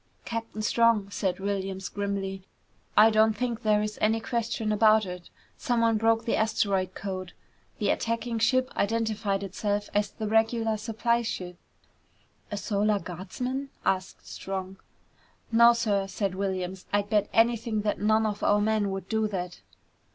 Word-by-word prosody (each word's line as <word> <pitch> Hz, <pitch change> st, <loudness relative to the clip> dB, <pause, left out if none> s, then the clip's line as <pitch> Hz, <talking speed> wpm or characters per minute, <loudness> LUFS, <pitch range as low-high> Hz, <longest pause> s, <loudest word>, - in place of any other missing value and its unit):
"Captain 230 Hz, -2 st, -4 dB
Strong," 220 Hz, -3 st, +3 dB
said 185 Hz, -1 st, -1 dB
Williams 195 Hz, -1 st, -3 dB
grimly, 200 Hz, -1 st, -3 dB, 0.6 s
"I 220 Hz, +2 st, +8 dB
don't 215 Hz, 0 st, +3 dB
think 235 Hz, -1 st, -2 dB
there 210 Hz, -1 st, +2 dB
is 210 Hz, 0 st, -5 dB
any 220 Hz, +1 st, +3 dB
question 225 Hz, -1 st, -2 dB
about 215 Hz, 0 st, +5 dB
it. 180 Hz, -1 st, -8 dB, 0.3 s
Someone 230 Hz, -2 st, +2 dB
broke 225 Hz, +1 st, +2 dB
the 230 Hz, -, +1 dB
asteroid 200 Hz, -4 st, 0 dB
code. 185 Hz, -2 st, -5 dB, 0.4 s
The -, -, +1 dB
attacking 230 Hz, 0 st, -2 dB
ship 255 Hz, +3 st, +2 dB
identified 215 Hz, -2 st, 0 dB
itself 205 Hz, +1 st, -2 dB
as 205 Hz, 0 st, +1 dB
the 220 Hz, -, -5 dB
regular 225 Hz, 0 st, +2 dB
supply 230 Hz, +2 st, 0 dB
ship." 180 Hz, -6 st, -5 dB, 0.9 s
"A 205 Hz, -, -4 dB
Solar 205 Hz, 0 st, +1 dB
Guardsman?" 250 Hz, +10 st, -5 dB, 0.2 s
asked 185 Hz, 0 st, -1 dB
Strong. 190 Hz, 0 st, -5 dB, 0.7 s
"No, 235 Hz, +1 st, +7 dB
sir," 205 Hz, -4 st, 0 dB
said 195 Hz, -1 st, -2 dB
Williams. 185 Hz, -1 st, -3 dB
"I'd 205 Hz, 0 st, 0 dB
bet 205 Hz, -1 st, +2 dB
anything 225 Hz, -1 st, +2 dB
that 210 Hz, 0 st, -1 dB
none 215 Hz, +1 st, +3 dB
of 205 Hz, -1 st, -2 dB
our 205 Hz, -, +3 dB
men 210 Hz, -1 st, +1 dB
would 195 Hz, 0 st, -5 dB
do 220 Hz, -1 st, 0 dB
that!" 180 Hz, -3 st, -5 dB
210 Hz, 145 wpm, -27 LUFS, 195-225 Hz, 0.9 s, I